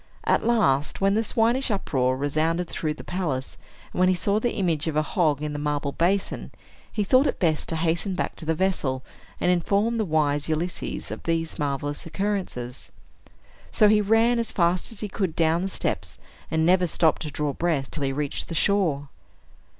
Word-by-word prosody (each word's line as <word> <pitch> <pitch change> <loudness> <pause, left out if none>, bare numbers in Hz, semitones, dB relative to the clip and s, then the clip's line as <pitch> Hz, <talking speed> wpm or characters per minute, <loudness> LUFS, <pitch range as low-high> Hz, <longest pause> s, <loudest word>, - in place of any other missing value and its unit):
At - - +2
last, 205 - +2
when 195 0 +3
the 220 +2 +2
swinish 235 +4 +1
uproar 130 - 0
resounded 155 +5 0
through 155 -2 -2
the - - -10
palace, 155 -8 -3 0.4
and - - -4
when 185 0 +5
he 185 - +3
saw 200 +4 +1
the 240 +2 -1
image 165 -5 0
of 160 - -1
a 155 - +3
hog 150 -2 +1
in 150 -1 -3
the 145 - -4
marble 145 -1 -1
basin, 185 +6 0 0.4
he 210 - 0
thought 255 +8 +4
it - - -1
best 160 -4 +1
to 165 - -1
hasten 170 +4 0
back - - -2
to 160 - -8
the 160 - +2
vessel, 150 -8 0 0.4
and 180 - +3
inform 200 +6 +1
the - - +2
wise 150 -4 +1
Ulysses 165 +3 -3
of - - -6
these 165 -1 -2
marvelous 145 +1 -2
occurrences. 180 -10 -3 0.8
So 215 - +4
he 210 0 +5
ran 225 +3 +3
as 230 - -2
fast 175 +2 +1
as 220 - -9
he 210 - -2
could 190 -4 -2
down 165 +1 +2
the 190 - -2
steps, - - -2 0.3
and 160 0 +1
never 180 +1 +4
stopped 160 -1 +2
to 155 - -3
draw 145 0 -2
breath 160 -5 -1
till 155 - -3
he 135 -1 0
reached 145 +1 -3
the 165 - -5
shore. 160 -8 +1
165 Hz, 195 wpm, -25 LUFS, 150-195 Hz, 0.8 s, when